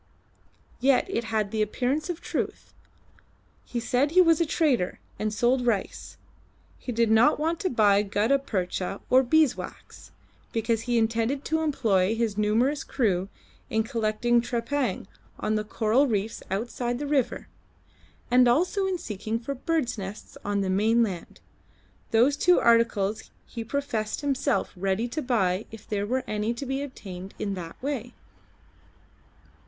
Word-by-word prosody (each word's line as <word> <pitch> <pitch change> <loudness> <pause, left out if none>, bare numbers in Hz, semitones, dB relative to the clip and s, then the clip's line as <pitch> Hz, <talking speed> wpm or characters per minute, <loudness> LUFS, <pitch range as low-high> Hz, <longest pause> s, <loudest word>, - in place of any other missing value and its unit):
Yet 265 +1 +3
it 235 - -2
had 220 -1 0
all 200 - -14
the 220 - -1
appearance 260 - -1
of 345 -1 -4
truth. - - -4 0.9
He 240 - -3
said 250 +4 +1
he 355 +4 +3
was 330 -1 +4
a 335 - +2
trader, 280 - +1 0.2
and 215 0 -1
sold 245 +4 +2
rice. 215 -5 -2 0.6
He 250 - -5
did 230 -1 +2
not 230 +7 +5
want 325 +2 0
to 380 - 0
buy 205 -4 +4
gutta 210 +7 +1
percha 190 -5 -3
or 260 +1 +7
beeswax, 300 +1 0 0.4
because 225 0 0
he 240 - +3
intended 230 +5 0
to 320 0 0
employ 220 -10 +1
his 225 -3 -1
numerous 230 +8 +1
crew 195 -7 0 0.4
in 220 0 +1
collecting 230 0 +1
trepang 240 -2 -2 0.3
on 215 - -1
the 215 0 0
coral 220 +6 +2
reefs 215 -2 -2
outside 240 +4 -2
the 290 - -4
river, 280 -4 0 0.8
and 250 0 +6
also 360 +10 +2
in 375 -1 -1
seeking 220 - -4
for 240 +4 -4
bird's 280 -4 -1
nests 195 +2 -8
on 205 0 0
the 190 - -1
mainland. 210 -2 0 0.7
Those 245 +6 +4
two 360 +4 +4
articles 225 -3 +2 0.2
he 230 - -6
professed 230 -3 -2
himself 280 0 0
ready 195 +5 -1
to 310 +6 -3
buy 205 -6 0
if 225 -1 -12
there 205 -1 -2
were 255 +3 0
any 215 +1 -2
to 275 - -5
be 270 +1 -2
obtained 195 -9 -8
in 200 -1 -2
that 175 -3 -7
way. 250 -4 -3
230 Hz, 150 wpm, -26 LUFS, 210-275 Hz, 0.9 s, or